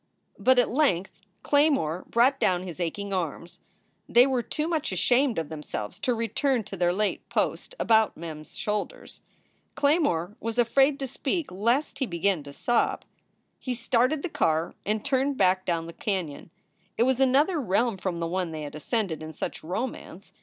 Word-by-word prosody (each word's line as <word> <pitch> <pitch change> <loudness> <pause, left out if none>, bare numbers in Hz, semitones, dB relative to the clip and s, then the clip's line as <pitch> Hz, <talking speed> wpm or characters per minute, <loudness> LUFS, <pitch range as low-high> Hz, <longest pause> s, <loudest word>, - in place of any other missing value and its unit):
But 260 0 +4
at 245 - +3
length 215 - +1 0.2
Claymore 280 - +2
brought 245 +4 +3
down 180 -1 +2
his 180 -2 -8
aching 195 +4 -3
arms. 170 -1 -4 0.5
They 240 +1 +7
were 260 -2 +1
too 300 +6 -3
much 320 -3 -1
ashamed 255 -1 +2
of 160 -3 -2
themselves 150 -9 -6
to 255 -3 0
return 230 +2 0
to 200 -1 -8
their 175 -1 +2
late 205 +3 -1
post - - -1
about 220 -1 +3
Mem 160 -2 -6
s 155 - -14
shoulders. 210 -1 -4 0.5
Claymore 280 - +1
was 230 +1 -4
afraid 270 +4 +4
to - - 0
speak 275 - -3
lest 235 +10 0
he 265 - 0
begin 175 -1 0
to 140 - -9
sob. 240 +11 0 0.5
He 255 -2 -3
started 250 +5 +1
the 360 - -2
car 160 - 0
and 215 0 -1
turned 275 0 +1
back 185 -1 +3
down 165 -2 0
the 170 - -8
canon. 180 -8 -3 0.5
It - - +4
was 260 0 +2
another 280 +6 +3
realm 225 0 +1
from 185 -2 -3
the 170 - -1
one 180 0 -1
they 155 -1 -5
had 145 0 -7
ascended 165 +1 -2
in 155 0 -7
such - - -5
romance. 195 0 -5
215 Hz, 175 wpm, -27 LUFS, 175-260 Hz, 0.5 s, They